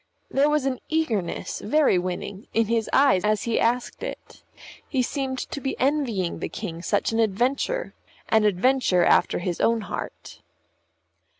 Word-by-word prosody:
There 280 +2 +3
was 300 -2 +1
an 260 -2 -1
eagerness, 235 - -1
very 280 -5 +3
winning, 185 +3 -5
in 225 0 +3
his 225 0 0
eyes 270 -10 +4
as 210 -1 +1
he 230 -1 0
asked 240 +2 0
it; - - -8 0.5
he 260 -4 +1
seemed 265 0 -2
to 280 - -5
be 270 - -3
envying 255 - 0
the - - -4
King 170 -6 -6
such 200 +5 0
an 225 - 0
adventure 250 - 0 0.3
an 220 -1 +3
adventure 210 -2 +3
after - - +3
his 175 -1 -3
own 230 0 +2
heart. 200 - -7
230 Hz, 155 wpm, -24 LUFS, 200-270 Hz, 0.5 s, eyes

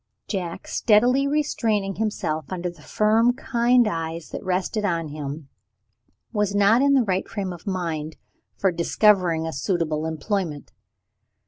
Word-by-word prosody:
Jack, 180 -5 -4
steadily 245 +6 +3
restraining 225 -9 0
himself 160 -8 -2
under 180 -1 -3
the 170 -3 -18
firm 220 +8 +2
kind 245 -2 +2
eyes 165 -3 -4
that - - -6
rested 185 +3 -1
on 165 -5 -1
him, 145 0 -6 0.9
was 210 -2 0
not 205 +4 +5
in 280 0 +4
the 260 - +4
right 190 -3 -1
frame 195 -3 -3
of 175 - -13
mind 165 -5 -3 0.4
for 190 - +2
discovering 170 -1 +2
a 160 - -4
suitable 160 +1 -1
employment. 160 -1 -3
185 Hz, 135 wpm, -24 LUFS, 165-215 Hz, 0.9 s, not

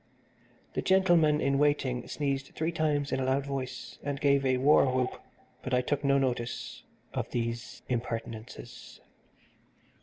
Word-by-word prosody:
The - - -1
gentleman 175 -5 +4
in 140 -1 +1
waiting 140 -4 +1
sneezed 140 -2 -2
three 160 +2 0
times 150 -3 0
in 130 - 0
a - - 0
loud 135 +1 +1
voice, 130 -3 -5
and 140 -1 -3
gave 140 -1 +3
a 130 -1 +2
war 135 0 +5
whoop, 130 0 -1 0.4
but 130 - -1
I 125 - +3
took 145 +3 -1
no 140 0 +4
notice 125 -3 -2 0.3
of - - -2
these 115 0 -4
impertinences. 115 -2 -5
135 Hz, 145 wpm, -29 LUFS, 125-145 Hz, 0.4 s, war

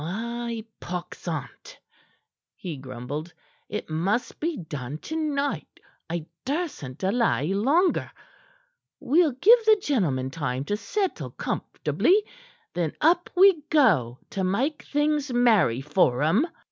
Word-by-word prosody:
"Ay, 230 +5 -4
pox 180 +1 -6
on't!" 145 -9 -6 0.8
he 170 -4 -6
grumbled. 135 +5 -6 0.4
"It 210 - -4
must 185 +9 -1
be 325 -1 -2
done 150 -4 -6
to 315 - -7
night. 290 -3 -2 0.3
I 170 -2 -3 0.2
dursn't 275 - -3
delay 195 - +1
longer. 290 - +2 0.9
We'll 310 +2 +3
give 445 - +6
the 435 -1 +6
gentlemen 155 - 0
time 135 -3 -3
to 205 - -1
settle 385 - -2
comfortably; 410 +4 0 0.5
then 170 -3 -1
up 340 +3 +3
we 370 -3 +6
go 175 - +3
to 195 - -2
make 255 +12 0
things 295 -1 0
merry 220 - +3
for 135 -2 +2
'em." 205 - +3
215 Hz, 120 wpm, -26 LUFS, -, 0.9 s, give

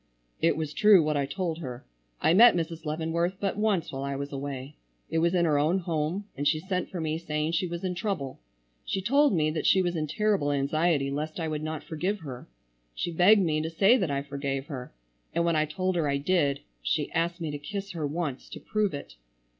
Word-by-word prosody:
"It 165 -2 +3
was 155 -2 -3
true 210 -5 +6
what 150 0 0
I 140 -1 0
told 170 +1 -3
her. 125 -5 -7 0.4
I 160 - +4
met 230 +4 +8
Mrs. 165 -1 -3
Leavenworth 165 +4 -1
but 195 -1 -1
once 210 -5 0
while 135 - -5
I 140 0 -2
was 140 +1 -4
away. 140 0 -5 0.4
It 165 - +2
was 170 +2 +2
in 175 -1 +3
her 150 -3 +3
own 155 +6 +2
home 170 +2 -2
and 145 +2 -1
she 155 +1 +3
sent 185 +2 -2
for 180 - -5
me 160 0 -1
saying 150 -1 -2
she 170 +2 0
was 170 +1 -5
in 185 -1 -1
trouble. 175 -8 -3 0.4
She 195 - -2
told 280 +9 +3
me 155 -4 +2
that 155 - -1
she 190 - +5
was 175 -1 -1
in 155 -2 -1
terrible 200 -3 +1
anxiety 145 +1 +1
lest 155 +4 -3
I 165 - -1
would 155 -1 -3
not 155 -1 -4
forgive 185 +7 -2
her. 130 -5 -8 0.5
She 175 - -2
begged 190 +5 +6
me 155 -3 +1
to 160 - -2
say 195 +8 +5
that 190 - 0
I 140 0 -1
forgave 140 -1 -3
her, 130 -4 -7 0.4
and 170 - +2
when 170 -1 +2
I 155 0 +3
told 185 +4 -2
her 160 -4 +1
I 140 - +1
did 145 -2 +1 0.2
she - - -1
asked 170 +2 0
me 160 -3 -3
to 145 - -5
kiss 200 +6 -5
her 160 -5 -2
once 145 -3 -4
to - - -8
prove 210 -7 -1
it. - - -9
160 Hz, 225 wpm, -28 LUFS, 145-180 Hz, 0.5 s, met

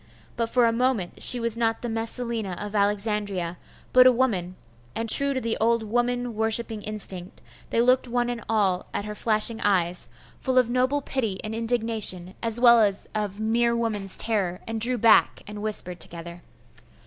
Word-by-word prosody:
But 230 -1 -2
for 245 0 +2
a 230 - +2
moment 235 -6 -2
she 250 - +3
was 230 -1 +1
not 225 0 -2
the - - -2
Messalina 225 -3 -4
of 205 0 -7
Alexandria, 200 -4 -1 0.4
but 255 0 +7
a - - +6
woman; 205 -8 -2 0.4
and 230 - -3
true 280 +5 +8
to - - -1
the 230 -2 -3
old 230 0 +1
woman 245 +2 -2
worshipping 220 0 0
instinct, 195 -4 -5 0.3
they 230 - +1
looked 255 +1 +2
one 240 0 -1
and 240 -2 -5
all 195 -5 0
at 205 - -3
her 210 - -6
flashing 220 +1 0
eyes, 180 -3 0 0.3
full 260 -1 -2
of 245 -2 +2
noble 260 +3 0
pity 225 -10 -3
and 215 - -5
indignation, 225 -6 0
as 230 0 -3
well 235 -2 +6
as 200 -2 -1
of 210 -2 -4
mere 235 +2 0
woman's 210 -5 +1
terror 195 -6 +2
and 225 -1 -5
drew 250 +2 +5
back, 230 0 +3
and 210 0 -9
whispered 195 -4 -3
together. 170 +1 -7
225 Hz, 175 wpm, -24 LUFS, 205-235 Hz, 0.4 s, true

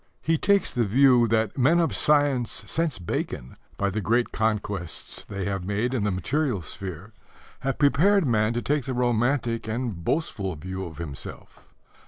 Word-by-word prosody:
He 165 - +2
takes 200 -1 +2
the 120 - +2
view 125 +2 +5
that 110 +1 0
men 155 +7 +4
of 165 - +1
science 145 -5 +2
since 165 - -1
Bacon, 80 -7 -4 0.2
by 100 -1 0
the 105 +3 -2
great 120 +4 +1
conquests 105 -5 -3
they 100 -2 -4
have 95 -2 -2
made 105 +6 -1
in 115 -6 0
the - - +2
material 120 - -1
sphere, 95 - -7 0.5
have 135 0 -2
prepared 165 +7 +4
man 110 -3 +2
to 120 - -2
take 145 -3 0
the 130 - -3
romantic 120 -1 +1
and 110 -6 -3
boastful 100 - -1
view 95 +5 -5
of 80 -4 -9
himself. 75 -5 -8
115 Hz, 165 wpm, -25 LUFS, 100-135 Hz, 0.5 s, view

